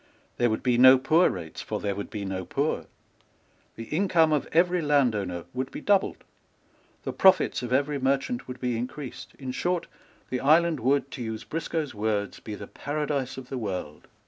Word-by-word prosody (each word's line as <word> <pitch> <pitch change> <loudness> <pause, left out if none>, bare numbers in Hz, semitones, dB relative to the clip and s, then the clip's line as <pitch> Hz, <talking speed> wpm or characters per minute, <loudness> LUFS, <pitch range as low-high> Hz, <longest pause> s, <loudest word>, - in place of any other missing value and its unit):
There 120 -1 +3
would 110 - -2
be 120 -1 +2
no 130 +1 +9
poor 155 +7 +4
rates; 85 -4 -6
for - - -4
there 100 - -1
would 100 +1 -6
be 105 -3 -5
no 95 -1 -3
poor. - - -1 0.9
The 115 - -6
income 160 - +2
of 150 - 0
every 175 +2 +3
landowner 110 - +1
would 130 +1 -3
be - - -7
doubled. 200 -1 +1 0.8
The - - -4
profits 190 -1 +4
of 125 -1 -5
every 140 +2 +1
merchant 135 - 0
would 125 0 -7
be 125 -1 -1
increased. 125 0 -7
In 130 -2 -5
short, 175 +6 -1 0.5
the 125 - 0
island 160 +3 +4
would, 140 +3 +1
to 130 - -7
use 110 -1 -4
Briscoe's 160 -2 -3
words, 105 -1 -2
be 105 - -7
the - - -8
paradise 145 -3 -3
of 130 -1 -9
the 130 - -3
world. 90 -8 -5
130 Hz, 180 wpm, -27 LUFS, 110-150 Hz, 0.9 s, no